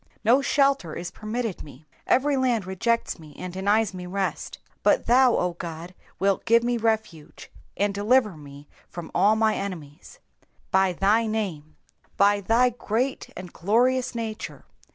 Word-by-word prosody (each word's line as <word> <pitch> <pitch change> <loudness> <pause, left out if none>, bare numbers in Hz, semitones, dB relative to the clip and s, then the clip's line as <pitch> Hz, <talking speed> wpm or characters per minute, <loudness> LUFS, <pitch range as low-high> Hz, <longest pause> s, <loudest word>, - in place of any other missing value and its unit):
No 245 +6 +4
shelter 275 - +1
is 175 - -6
permitted 220 -1 -4
me. 145 +1 -13 0.2
Every 285 +2 +3
land 245 -6 +1
rejects 190 +3 -1
me 155 -3 -14
and 180 -1 -7
denies 200 +2 +1
me 180 -1 -7
rest. 195 +1 -3 0.2
But - - +2
thou, 250 0 +5
O 180 -1 0
God, 170 0 -8 0.2
wilt 195 0 0
give 230 +1 +4
me 240 0 0
refuge, 215 -9 -3 0.3
and 200 +2 +1
deliver 210 0 +2
me 145 -1 -13 0.2
from 170 -2 -8
all 210 +2 +4
my 220 0 +2
enemies. 165 -9 -7 0.2
^^ - - -35 0.3
By 190 0 +3
thy 210 +6 +2
name,^^ 180 -9 -4 0.4
by 200 0 +4
thy 235 +5 +3
great 245 +3 -2
and 180 -2 -9
glorious 250 +6 +1
nature. 225 -2 -6
205 Hz, 155 wpm, -25 LUFS, 180-235 Hz, 0.4 s, thou